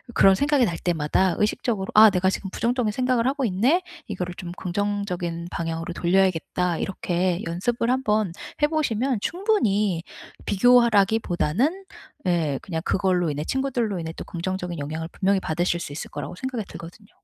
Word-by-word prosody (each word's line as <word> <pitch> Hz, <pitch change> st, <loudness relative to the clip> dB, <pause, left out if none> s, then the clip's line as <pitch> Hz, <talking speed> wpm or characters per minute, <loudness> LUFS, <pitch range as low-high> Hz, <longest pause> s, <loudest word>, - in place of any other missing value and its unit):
그런 195 Hz, -, +7 dB
생각이 285 Hz, +3 st, +3 dB
날 170 Hz, -4 st, -2 dB
때마다 175 Hz, +2 st, +1 dB
의식적으로 210 Hz, -1 st, -1 dB
'아 215 Hz, 0 st, +9 dB
내가 190 Hz, 0 st, +1 dB
지금 195 Hz, -, -4 dB
부정적인 235 Hz, +1 st, 0 dB
생각을 250 Hz, 0 st, +1 dB
하고 275 Hz, -1 st, 0 dB
있네. 245 Hz, -, +2 dB, 0.2 s
이거를 180 Hz, -4 st, -4 dB
좀 175 Hz, -1 st, -7 dB
긍정적인 180 Hz, -3 st, -2 dB
방향으로 165 Hz, +1 st, -3 dB
돌려야겠다.' 180 Hz, -1 st, +1 dB
이렇게 180 Hz, -1 st, -1 dB
연습을 230 Hz, +8 st, -1 dB
한번 215 Hz, -7 st, +1 dB, 0.3 s
해 -, -, +7 dB
보시면 265 Hz, -6 st, 0 dB
충분히 215 Hz, -, +1 dB, 0.4 s
비교하라기 225 Hz, -1 st, +4 dB
보다는 240 Hz, -, 0 dB, 0.4 s
예 160 Hz, -6 st, +1 dB
그냥 165 Hz, -4 st, -3 dB
그걸로 180 Hz, -4 st, +1 dB
인해 145 Hz, +1 st, -3 dB
친구들로 245 Hz, -, -1 dB
인해 160 Hz, -1 st, -4 dB
또 -, -, -6 dB
긍정적인 180 Hz, -1 st, -4 dB
영향을 160 Hz, +3 st, -4 dB
분명히 195 Hz, 0 st, +1 dB
받으실 175 Hz, 0 st, -1 dB
수 145 Hz, -, -6 dB
있을 150 Hz, -, -6 dB
거라고 -, -, -6 dB
생각이 245 Hz, -2 st, -4 dB
들거든요. 180 Hz, +5 st, -11 dB
195 Hz, 385 characters per minute, -24 LUFS, 175-235 Hz, 0.4 s, 아